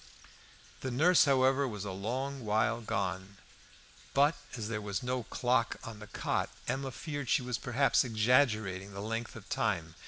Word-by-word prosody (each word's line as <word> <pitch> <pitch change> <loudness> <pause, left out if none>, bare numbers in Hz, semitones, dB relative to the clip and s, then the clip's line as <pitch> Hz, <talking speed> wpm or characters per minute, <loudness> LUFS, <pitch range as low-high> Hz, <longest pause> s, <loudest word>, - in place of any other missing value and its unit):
The 130 - -3
nurse, 160 +9 +5
however, 135 0 +3
was 105 -4 -5
a 100 - -3
long 130 +8 -3
while 110 +2 +1
gone. 95 -2 -3 0.8
But, 145 +3 +5 0.2
as 110 -2 -3
there 105 -2 -3
was 105 +4 -3
no 125 0 -1
clock 120 +1 0
in 110 -2 -8
the 105 - -10
cot, - - -1 0.2
Emma 135 0 -1
feared 145 -1 -5
she - - +3
was 125 -2 -2
perhaps 130 +4 +3
exaggerating 110 -5 +2
the 100 - -6
length 115 +2 -4
of 110 -2 -11
time. 90 -7 -1
115 Hz, 160 wpm, -32 LUFS, 105-130 Hz, 0.8 s, nurse